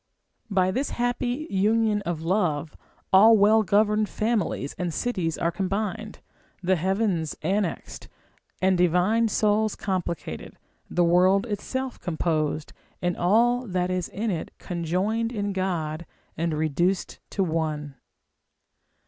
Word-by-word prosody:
By 185 -2 +2
this 265 +7 -1
happy 245 +4 -1
union 210 +2 +2
of 165 -2 -3
love, 165 -5 0 0.4
all 220 +4 +8
well 215 +2 +5
governed 210 +1 +2
families 210 - -1
and 180 -2 -1
cities 175 -5 -2
are 170 - 0
combined, 210 +3 -3 0.4
the 185 +1 +3
heavens 185 -2 0
annexed, 190 +1 -2 0.6
and 185 -1 +3
divine 180 +7 +3
souls 215 0 +1
complicated, 170 - -4 0.3
the 175 - +2
world 185 +4 +4
itself 260 +4 -4
composed, 155 -3 -1 0.3
and 175 0 -1
all 240 +7 +2
that 180 -1 -1
is 180 -1 -2
in 215 +2 -2
it 170 - -3
conjoined 190 +7 -1
in 205 -3 -2
God, 170 -4 -2 0.3
and 165 -1 -1
reduced 165 +5 0
to 195 - 0
one. 155 -4 -2
190 Hz, 120 wpm, -25 LUFS, 170-215 Hz, 0.6 s, all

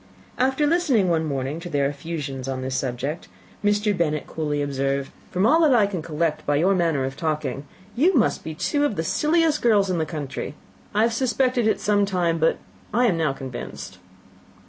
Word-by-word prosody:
After 265 +3 +2
listening 290 - +2
one 160 -1 +1
morning 140 +1 -3
to 175 +1 -7
their 145 -3 +1
effusions 145 -3 -5
on 130 -1 -3
this 130 0 -3
subject, 135 +6 -3 0.4
Mr. 205 0 +2
Bennet 155 -4 0
coolly 150 -2 -2
observed, 135 -1 -1 0.2
"From 185 +3 +1
all 315 +8 +5
that 295 -6 +5
I 215 -4 +5
can 195 -4 -3
collect 155 0 -1
by 145 - +1
your 180 +7 +3
manner 165 -7 +1
of 135 +1 -4
talking, 150 -3 -2 0.3
you 330 +9 +3
must 240 - +2
be 160 - -6
two 290 - 0
of 290 -8 +1
the 160 - -1
silliest 310 - +2
girls 205 -5 +3
in 175 - 0
the 160 - 0
country. 145 -2 -5 0.4
I 215 - +4
have 230 0 +2
suspected 250 -1 +1
it 220 - +1
some 205 -1 +2
time, 175 -4 0
but 160 - +2 0.3
I 245 +3 +3
am 205 -7 +3
now 155 -3 +2
convinced." 130 -2 -8
165 Hz, 190 wpm, -23 LUFS, 145-220 Hz, 0.4 s, all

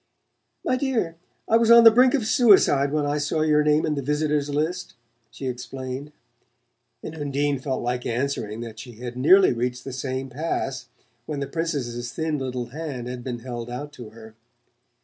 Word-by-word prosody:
"My 255 - +1
dear, 245 -11 -1 0.3
I 225 - +5
was 230 0 +2
on 235 0 +9
the 225 - +10
brink 250 +4 +5
of 250 -6 -1
suicide 195 - +4
when 150 -1 0
I 145 +1 0
saw 150 +2 -1
your 150 -1 +3
name 150 +1 +3
in 155 - 0
the 140 - -2
visitors' 150 +1 0
list," 155 +5 -2 0.3
she 135 - -9
explained; 130 +2 -5 0.9
and 155 - -6
Undine 145 -2 -1
felt 130 -1 -3
like 125 +1 -2
answering 120 -3 -2
that 115 -2 -8
she 120 0 -9
had 120 +2 -7
nearly 185 +9 +5
reached 125 +1 -3
the 135 - -7
same 130 0 -3
pass 135 -1 -3 0.4
when 150 -2 -3
the 140 - -2
Princess's 135 -6 -3
thin 160 -2 -2
little 125 -2 -3
hand 140 -4 -6
had 125 -1 -6
been 120 -2 -5
held 120 -1 -6
out 145 +4 -6
to 120 -6 -10
her. 110 0 -14
140 Hz, 180 wpm, -24 LUFS, 125-155 Hz, 0.9 s, the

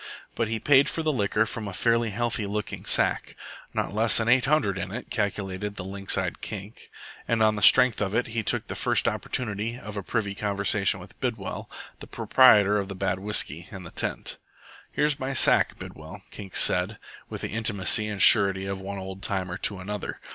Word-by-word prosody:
But 115 - -1
he 110 0 -3
paid 140 +1 +4
for 165 - -3
the 155 -1 0
liquor 105 -2 +1
from 110 -2 -6
a 100 - -6
fairly 115 +3 +1
healthy 115 0 -2
looking 105 -1 -5
sack. - - +2 0.4
"Not - - -3
less 110 +2 +4
'n 115 - -1
eight 125 0 +4
hundred 110 -10 +1
in 95 - -5
it," 120 +4 -7
calculated 100 -1 -3
the 95 - -6
lynx 95 +1 0
eyed 95 -3 -3
Kink; 105 0 -9 0.4
and 115 -1 +1
on 110 0 +3
the 105 - -5
strength 115 +4 +5
of 100 0 -2
it 120 - +1
he 115 0 -3
took 105 - -2
the - - -6
first - - 0
opportunity 115 0 -2
of 105 -4 -9
a - - -2
privy 100 0 -2
conversation 100 -1 0
with 90 - -14
Bidwell, 115 -7 -4 0.4
proprietor 105 -5 +4
of 100 - -4
the 95 - -7
bad 95 -1 -2
whisky 95 -4 -1
and 95 -3 -9
the - - -10
tent. - - -4 0.5
"Here's 150 -2 0
my 135 +1 -3
sack, - - +4
Bidwell," - - -10
Kink 95 -3 -10
said, - - +3 0.3
with - - -7
the - - -4
intimacy 105 -1 +2
and 105 -2 -5
surety 100 -2 +5
of 95 -1 -5
one 100 +1 -6
old 95 0 -8
timer 95 -3 -2
to 100 - +2
another. 105 +2 -6
105 Hz, 195 wpm, -25 LUFS, 95-115 Hz, 0.5 s, strength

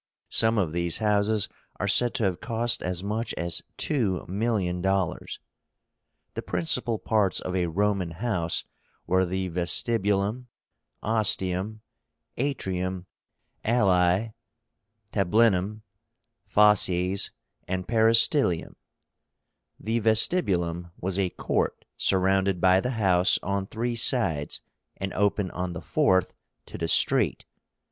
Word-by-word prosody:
Some 115 0 +4
of 90 -6 0
these 85 0 -1
houses 105 0 +1 0.3
are 100 - -1
said 120 +4 +3
to - - 0
have 90 -3 -1
cost 115 +1 -1
as 90 0 -2
much 110 +3 -3
as 85 -1 0 0.2
two 110 -11 -1
million 95 -3 -1
dollars. 95 -2 -1 0.9
The - - -4
principal 110 +7 0
parts 105 -3 +1
of 90 - -4
a 90 -2 0
Roman 100 +1 0
house 85 -2 -2 0.4
were 95 0 +2
the 95 +1 -2
Vestibulum, 100 +5 0 0.6
Ostium, 105 -1 0 0.6
Atrium, 95 -9 -2 0.6
Alae, 100 -2 +2 0.8
Tablínum, 105 0 +2 0.7
Fauces, 100 -2 +3 0.4
and 95 0 -3
Peristylium. 115 - +3 1.1
The 115 +2 -1
VESTIBULUM 95 - +1
was 95 +1 -2
a 95 -2 +1
court - - -2
surrounded 95 0 +1
by 95 +1 +4
the 125 - -2
house 95 -3 +4
on 100 0 -2
three 120 +3 -3
sides, 110 - 0 0.4
and 95 0 -4
open 100 -1 0
on 90 -1 -4
the - - -5
fourth 95 -2 +1 0.3
to - - -9
the 85 - -1
street. - - +2
95 Hz, 110 wpm, -26 LUFS, 90-110 Hz, 1.1 s, Some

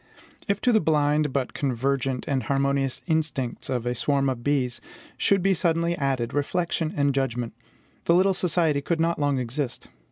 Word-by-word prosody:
If 200 -1 +1
to 250 - +3
the 220 - +5
blind 150 -3 +2
but 130 -1 -2
convergent 135 -1 -1
and 135 -2 0
harmonious 140 +1 0
instincts 155 -7 -1
of 125 -2 -1
a 120 - 0
swarm 140 +2 +1
of 120 -2 -6
bees 130 -3 0 0.3
should 195 -2 +2
be 195 0 +4
suddenly 170 -1 +1
added 135 -5 -1
reflection 165 +2 -1
and 140 -1 +2
judgment, 125 -3 -1 0.5
the 170 - +4
little 190 +2 +4
society 165 -5 +1
could 165 +3 -1
not 165 0 +1
long 145 -2 +1
exist. 125 +1 -3
140 Hz, 165 wpm, -25 LUFS, 130-165 Hz, 0.5 s, the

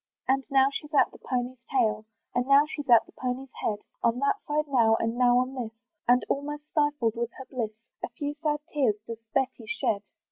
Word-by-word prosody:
And 270 +1 +2
now 270 -1 +5
she's 295 +1 -5
at 265 - +5
the - - -14
pony's 250 0 -3
tail, 220 -5 +1 0.3
And 245 +1 0
now 280 +1 +7
she's 290 -3 -6
at 235 -2 +7
the - - -19
pony's 255 +1 -4
head, 210 - +1 0.2
On 235 +1 +2
that 280 +9 +2
side 300 +1 0
now, 230 -5 +4
and 225 +1 -1
now 245 0 +4
on 255 +1 +1
this, 240 -4 -5 0.3
And 245 +1 +4
almost 295 +1 -2
stifled 290 -7 +1
with 235 0 -2
her 265 - -9
bliss, 235 -5 -3 0.3
A - - -2
few 290 +5 -4
sad 295 -2 0
tears 260 -8 +3
does 230 -1 -7
Betty 260 -4 0
shed. 205 -1 0
255 Hz, 205 wpm, -28 LUFS, 235-280 Hz, 0.3 s, now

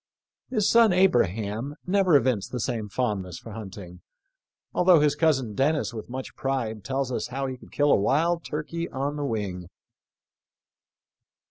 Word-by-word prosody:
His 215 -6 +1
son 230 -3 +6
Abraham 120 - +1
* - - -40
never 185 -3 +3
evinced 130 -8 +2
the 125 - -3
same 110 -2 -2
fondness 95 -7 -2
for 115 - -10
hunting, 95 -4 -9 0.7
although 180 -2 +5
his 150 -1 +3
cousin 145 -8 +1
Dennis 140 +3 +1
with 110 0 -7
much 130 +1 -6
pride 120 -6 -2
tells 135 +2 -2
us - - -2
how 135 +2 -3
he 130 -1 -3
could 125 - -16
kill 145 0 +2
a - - +7
wild 165 +9 +1
turkey 165 +3 -4
on 140 +2 -3
the 145 -1 -3
wing. 95 -7 -3
130 Hz, 155 wpm, -26 LUFS, 110-150 Hz, 0.7 s, a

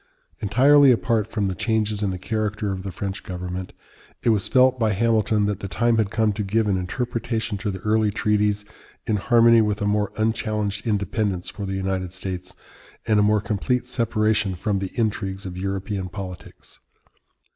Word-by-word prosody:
Entirely 135 +7 +5
apart 115 -3 +1
from 105 -3 -1
the 95 - -1
changes 110 +1 0
in 100 - +1
the 95 - -3
character 105 +1 -2
of 95 -1 -4
the 95 0 -5
French 95 +1 -4
government, 90 0 -5 0.5
it - - +3
was 105 -3 +2
felt 130 -1 +4
by 110 -2 +2
Hamilton 110 0 +2
that 105 -2 -1
the 100 - -5
time 115 +3 +1
had 110 -3 +1
come 110 0 +1
to 105 - -3
give 105 +3 +1
an 100 - +2
interpretation 115 +3 -2
to 105 - -2
the 95 - -3
early 110 0 +2
treaties 105 0 +1 0.4
in 110 - +1
harmony 115 +2 +5
with 105 -1 0
a 105 - -1
more 105 0 +1
unchallenged 110 -1 -1
independence 100 -3 -1
for 100 -2 -6
the 95 - -3
United 95 -2 -2
States, 90 -1 -6 0.5
and 110 -1 +3
a - - +5
more 105 0 +3
complete 120 +5 -1
separation 110 -5 0
from 100 +2 -1
the 95 -1 -3
intrigues 100 -4 -2
of 90 -1 -6
European 95 0 -3
politics. 90 -2 -9
105 Hz, 180 wpm, -23 LUFS, 95-110 Hz, 0.5 s, Entirely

